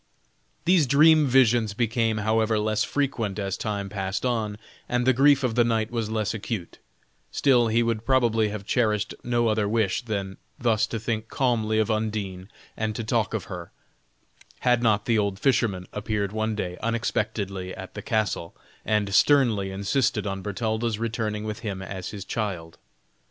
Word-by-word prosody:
These 175 -5 +4
dream 155 +3 +6
visions 120 -5 +3
became, 115 -1 +1
however, 110 0 +2
less 110 0 +1
frequent 120 -8 -1
as 100 -2 -2
time 100 -2 -3
passed 95 +2 -3
on, 110 -4 -1 0.3
and 125 0 +1
the 130 - +5
grief 140 +2 +4
of 125 -3 +1
the 120 +1 +4
knight 115 -1 0
was 115 -3 -2
less 110 -1 -1
acute; 100 -4 -5 0.5
still 125 -4 +3
he 115 +1 +2
would 115 -1 -1
probably 115 -4 +2
have 105 -1 -6
cherished 110 -3 +1
no 120 -1 +1
other 110 -2 +1
wish 110 -2 +1
than 100 -5 -4 0.2
thus 115 -3 +2
to 115 - -4
think 110 0 -3
calmly 115 -5 0
of 110 +1 +2
Undine 105 -4 -3 0.3
and 110 -1 -2
to 115 - -3
talk 110 -1 0
of 110 - -2
her, 90 -3 -8 0.9
had 125 -1 +3
not 105 -3 +2
the 115 -2 +2
old 100 -2 -1
fisherman 105 -7 +1
appeared 105 -1 -2
one 110 0 -1
day 90 -4 -4
unexpectedly 105 -4 -2
at 95 0 -9
the 105 - -6
castle, 105 -6 -1 0.3
and 105 -2 0
sternly 115 -8 +4
insisted 100 +3 0
on 95 -1 -3
Bertalda's 110 +2 -2
returning 110 -2 -2
with 110 0 -4
him 100 -4 -4
as 95 -1 -6
his 100 -2 -7
child. 90 -7 -4
110 Hz, 165 wpm, -25 LUFS, 100-115 Hz, 0.9 s, dream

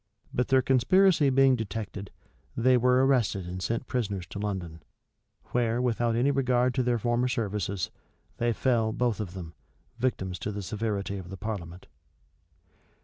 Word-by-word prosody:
But 125 - 0
their 130 -1 +4
conspiracy 155 +5 +4
being 135 0 +5
detected, 105 -3 -5 0.5
they 125 +2 +4
were 125 +2 +4
arrested 115 -8 +1
and 90 +1 -5
sent 115 +7 -2
prisoners 100 -8 -2
to 100 - -5
London; 90 -6 -4 0.7
where, 120 -1 +1
without 120 -2 +1
any 125 +4 +3
regard 125 -2 +2
to 130 - +1
their 125 -1 +1
former 120 +2 +1
services, 100 -6 -2 0.5
they 120 0 +1
fell, 115 -2 +1
both 120 -2 0
of 95 -4 -5
them, 85 -3 -7 0.5
victims 95 -7 -1
to 105 - -3
the 100 -1 -5
severity 100 0 -3
of 90 -2 -10
the 95 - -7
parliament. 95 -5 -6
115 Hz, 150 wpm, -28 LUFS, 100-125 Hz, 0.7 s, being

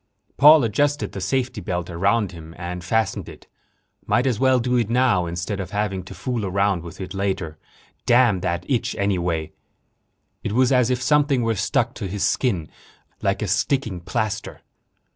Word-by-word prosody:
Paul 150 +1 +8
adjusted 145 +6 0
the - - -6
safety 130 -1 -1
belt 90 -3 -3
around 100 +4 +1
him, 80 -1 -11
and 90 0 -5
fastened 110 +1 -1
it. - - -13 0.6
Might 125 - +2
as 125 -5 0
well 130 -1 +4
do 125 +1 0
it 115 -3 0
now, 120 -7 +2
instead 85 +4 -4
of 95 -3 -4
having 100 -2 -2
to - - -10
fool 125 -4 -3
around 100 -1 +1
with 85 0 -10
it 95 0 -6
later. 95 -6 -3 0.5
Damn 120 -5 +4
that 90 -1 -3
itch, 125 -4 -1
anyway! 90 -6 -1 0.9
It 105 - -2
was 130 +2 +3
as 125 -2 +3
if 125 0 0
something 145 -2 +3
were 115 0 +1
stuck 115 +3 0
to 100 - -5
his 95 +1 -3
skin 95 - 0 0.5
like - - 0
a - - -2
sticking 125 -10 0
plaster.... 110 +4 -3
105 Hz, 170 wpm, -22 LUFS, 90-125 Hz, 0.9 s, Paul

